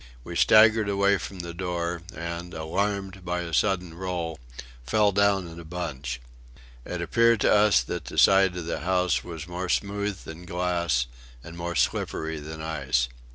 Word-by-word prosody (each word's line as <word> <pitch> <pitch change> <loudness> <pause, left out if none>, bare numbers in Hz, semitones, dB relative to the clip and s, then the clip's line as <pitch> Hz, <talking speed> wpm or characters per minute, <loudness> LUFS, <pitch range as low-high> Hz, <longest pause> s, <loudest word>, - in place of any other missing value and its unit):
We - - -7
staggered 110 -1 +6
away 100 0 +3
from 95 -2 -6
the 85 0 -7
door, 85 -1 -3 0.2
and, 85 +1 -5
alarmed 95 +4 -2
by 90 0 -2
a 85 -1 -6
sudden 90 -1 +1
roll, 85 -3 -4 0.4
fell 105 - +3
down 100 -1 +2
in 85 0 -10
a - - -8
bunch. 75 -7 -5 0.7
It 90 -1 -4
appeared 115 +4 +3
to - - +4
us 105 -1 +5
that 85 -5 -5
the - - -8
side 95 -2 +5
of 85 - -4
the 85 - -3
house 90 -1 +1
was 85 -2 -7
more 90 +1 -4
smooth 100 -1 -1
than 85 +2 -10
glass 85 -7 0 0.4
and 80 +1 -10
more 85 0 -4
slippery 80 0 -1
than 80 +1 -7
ice. 65 -6 0
90 Hz, 165 wpm, -26 LUFS, 80-95 Hz, 0.7 s, staggered